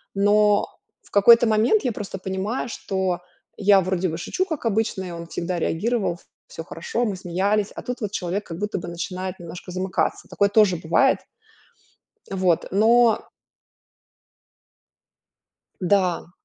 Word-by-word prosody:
Но 205 +1 +3 0.4
в - - -23
какой-то 230 +4 +7
момент 220 - +3
я 250 - 0
просто 200 -2 -6
понимаю, 190 +7 -3
что 190 -4 -2 0.4
я 200 -1 +5
вроде 185 0 -1
бы 160 - -4
шучу, 365 - -2
как 315 -9 -5
обычно, 220 -3 0
и 180 - -6
он 170 0 -7
всегда 175 +1 -3
реагировал, 195 +3 0
ф - - -18 0.3
всё 165 - -8
хорошо, 225 +10 -3
мы 205 -4 -2
смеялись. 195 +3 0
А - - -7
тут 250 +1 -5
вот 210 -2 -3
человек 190 +2 -3
как 165 - -7
будто 210 +1 -2
бы 175 - -7
начинает 185 +2 -5
немножко 175 +2 -9
замыкаться. 185 +1 -2
Такое 200 0 +1
тоже 205 -3 +4
бывает. 170 +12 +2 1.1
Вот, 185 -3 +1
но 225 +3 +4 2.5
Да. 180 -2 +1
195 Hz, 140 wpm, -23 LUFS, 180-215 Hz, 2.5 s, какой-то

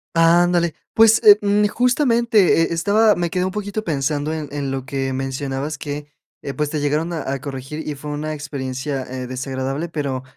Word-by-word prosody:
Ándale. 170 0 +4 0.2
Pues, 225 0 +6
eh, 205 -1 +9
mm, 205 0 +2
justamente 235 - +3
e - - 0
estaba, 205 +6 +3
me 175 -1 -1
quedé 180 0 -1
un 190 - -2
poquito 210 +1 -4
pensando 150 -2 -1
en 155 -2 -5
en 140 -2 -3
lo 135 -1 -3
que 135 0 -2
mencionabas 135 +2 -3
que, 145 0 -6 0.4
eh, 140 - -4
pues, 150 -1 -1
te 155 - -1
llegaron 150 +4 -1
a 150 -5 -3
a 135 - -2
corregir 135 +3 -6
y 150 - -2
fue 150 +2 -8
una 150 +1 -3
experiencia, 135 -2 -4
eh, 130 0 -6
desagradable, 130 +4 -3
pero 140 -5 -3
150 Hz, 185 wpm, -20 LUFS, 135-175 Hz, 0.4 s, eh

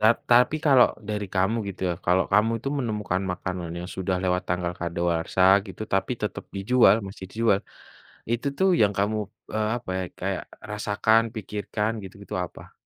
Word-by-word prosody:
Ta 110 - +4 0.2
tapi 125 +5 +5
kalau 135 -4 +7 0.2
dari 105 -1 -2
kamu 95 +4 +2
gitu, 100 - -8
ya, - - -1
kalau 90 +2 +4
kamu 105 +3 +4
itu - - -2
menemukan 105 -6 -1
makanan 90 -2 -4
yang 90 - -6
sudah 95 0 -1
lewat 90 0 +1
tanggal 90 -1 -1
kadaluarsa 85 +1 0 0.2
gitu 95 +2 -8
tapi 95 +6 +1
tetap 105 - -3
dijual 120 +6 +5
masih 95 0 -9
dijual, 110 -2 +2 0.7
itu, 120 +4 -1
tuh, 190 - +4
yang 105 -2 +4
kamu, 105 +2 +1 0.4
eee, 110 0 +1
apa, 120 -5 -7
ya, - - -1 0.2
kayak - - -2 0.3
rasakan, 105 +2 +2
pikirkan, 105 0 -2
gitu-gitu 100 0 -9
apa? 90 - -12
100 Hz, 165 wpm, -25 LUFS, 90-110 Hz, 0.7 s, kalau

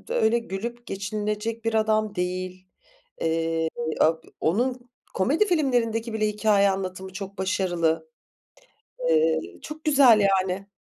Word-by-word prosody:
öyle 235 - +2
gülüp 235 +2 -6
geçinilecek 210 +3 -3
bir 225 - 0
adam 215 -1 +1
değil. 185 0 -4 0.5
Eee, 165 0 0 0.3
a 160 - +6 0.3
onun 245 +7 0 0.2
komedi 290 - +2
filmlerindeki 240 - +1
bile 215 -1 0
hikâye 205 -1 +3
anlatımı 190 0 -4
çok 195 +1 -7
başarılı. 175 -4 0 1.0
Eee, 475 0 +3 0.2
çok 310 +1 -9
güzel 270 -8 +6 0.2
yani. 190 +1 -4
210 Hz, 110 wpm, -25 LUFS, 185-235 Hz, 1.0 s, a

